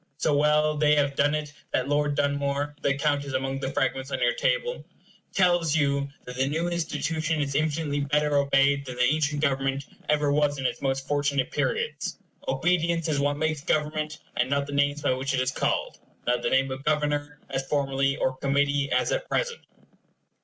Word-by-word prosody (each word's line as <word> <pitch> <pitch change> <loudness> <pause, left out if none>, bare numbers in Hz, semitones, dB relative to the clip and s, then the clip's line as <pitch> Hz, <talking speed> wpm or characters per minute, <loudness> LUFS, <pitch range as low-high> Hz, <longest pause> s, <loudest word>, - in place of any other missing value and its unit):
So 155 -2 +1
well 150 +1 +3
they 150 0 +4
have 140 -1 +2
done 145 +2 +3
it, 150 -1 -4 0.2
that 130 - +1
Lord 145 0 +1
Dunmore 145 0 0
the 140 - +1
account 145 0 +1
is 140 -1 -6
among 135 +1 -1
the 135 0 -3
fragments 135 -1 -1
on - - -2
your - - +3
table - - 0 0.5
tells 175 -4 +3
you 140 -2 +1 0.2
that 125 0 -8
the 135 +1 +1
new 165 +4 -1
institution 160 -1 -1
is 140 -1 -1
infinitely 150 0 0
better 150 +1 +1
obeyed 140 0 +3
than 130 -2 -7
the 125 - +1
ancient 150 +2 +1
government 135 -1 0 0.2
ever 150 -1 +2
was 145 -1 +2
in 135 - -4
its - - -1
most 135 0 -1
fortunate 145 -2 0
periods. 460 - -2 0.3
Obedience 170 - +1
is 145 -2 +1
what 145 0 +1
makes 155 -1 -1
government, 155 +1 -1 0.2
and 125 +1 +1
not 140 0 +1
the 145 - -7
names 145 +1 +1
by 135 - +3
which 135 +1 -1
it - - +1
is 130 +1 +1
called; - - -1 0.3
not 125 0 +1
the - - 0
name 135 0 +2
of 130 +1 -5
Governor, 150 -1 0
as 135 0 -2
formerly, 135 -1 +1
or 130 - 0
Committee, 140 0 +1
as - - +2
at - - -2
present. 475 -2 -1
145 Hz, 190 wpm, -26 LUFS, 140-150 Hz, 0.5 s, they